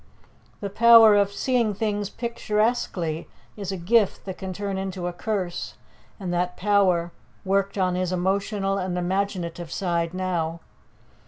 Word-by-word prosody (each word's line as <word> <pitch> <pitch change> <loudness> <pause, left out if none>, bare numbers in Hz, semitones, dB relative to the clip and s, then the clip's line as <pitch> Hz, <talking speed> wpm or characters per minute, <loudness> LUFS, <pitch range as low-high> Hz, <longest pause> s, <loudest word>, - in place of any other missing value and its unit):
The 200 -1 -4
power 230 0 +8
of 200 -1 +3
seeing 230 -1 0
things 205 -1 -1
picturesquely 210 -8 -1 0.3
is 200 -3 -5
a 190 - -3
gift 205 +4 +2
that 190 -2 -6
can 190 -1 -5
turn 200 +1 -3
into 190 -2 -4
a 175 - -2
curse, 175 - -3 0.4
and 180 -3 -3
that 180 0 -1
power 185 -4 +2 0.3
worked 195 +1 0
on 185 -2 +1
his 180 0 -1
emotional 195 +2 0
and 185 -1 -2
imaginative 175 -2 -2
side 170 -2 -1
now. 170 -3 -2
190 Hz, 140 wpm, -24 LUFS, 175-205 Hz, 0.4 s, power